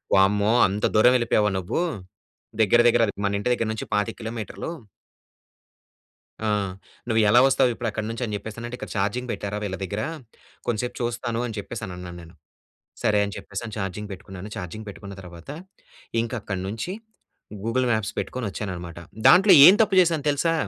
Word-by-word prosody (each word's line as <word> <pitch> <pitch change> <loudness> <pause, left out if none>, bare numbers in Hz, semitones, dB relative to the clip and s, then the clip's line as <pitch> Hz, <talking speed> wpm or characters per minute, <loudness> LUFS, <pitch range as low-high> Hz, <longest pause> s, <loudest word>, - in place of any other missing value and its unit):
"వామ్మో 100 +3 +4
అంత 100 +2 -1
దూరం 125 +4 +6
వెళ్ళిపోయావా, 110 -3 +2
నువ్వు 95 - -2 0.8
దగ్గర, 115 +3 +4
దగ్గర 120 0 +4
అది 100 - -3
మన 100 0 +1
ఇంటి 125 +5 0
దగ్గర 115 -2 -1
నుంచి 110 - -5
25 105 +2 0
కిలోమీటర్లు" 115 +6 -5 1.8
ఆ! - - +1 0.6
నువ్వు 115 -1 +3
ఎలా 120 +4 +7
వస్తావు 130 -1 +3
ఇప్పుడు 115 +1 -3
అక్కడి 110 0 -4
నుంచి 115 +2 -5
అని 105 - -3
చెప్పేస్తానంటే, 115 +4 -7
"ఇక్కడ - - -7
చార్జింగ్ 105 +6 -1
పెట్టారా 100 0 -4
వీళ్ళ 95 -2 -3
దగ్గర 100 +3 -3 0.7
కొంసేపు 120 +1 -1
చూస్తాను" 120 -1 -2
అని 115 -2 -6
చెప్పేసి 110 +3 -6
అని 90 - -7
అన్నాను 90 -1 -8
నేను. 85 0 -15 0.7
సరే! 105 -1 +3
అని 100 - -5
చెప్పేసి 105 +4 -6
ఛార్జింగ్ 100 +1 -4
పెట్టుకున్నాను. 95 +1 -9
ఛార్జింగ్ 105 +5 -6
పెట్టుకున్న 100 0 -9
తర్వాత, 85 +3 -11 0.7
ఇంక 115 - -5
అక్కడి 95 -2 -4
నుంచి 110 - -4 0.7
గూగుల్ 125 +3 +1
మ్యాప్స్ 110 -3 0
పెట్టుకొని 125 -3 -3
వచ్చాననమాట. 85 -4 -6 0.3
దాంట్లో 195 +3 +7
ఏం 190 - +10
తప్పు 210 -3 +1
చేశాను 165 -4 +1
తెలుసా! 165 +4 +1
110 Hz, 160 wpm, -24 LUFS, 100-120 Hz, 1.8 s, ఏం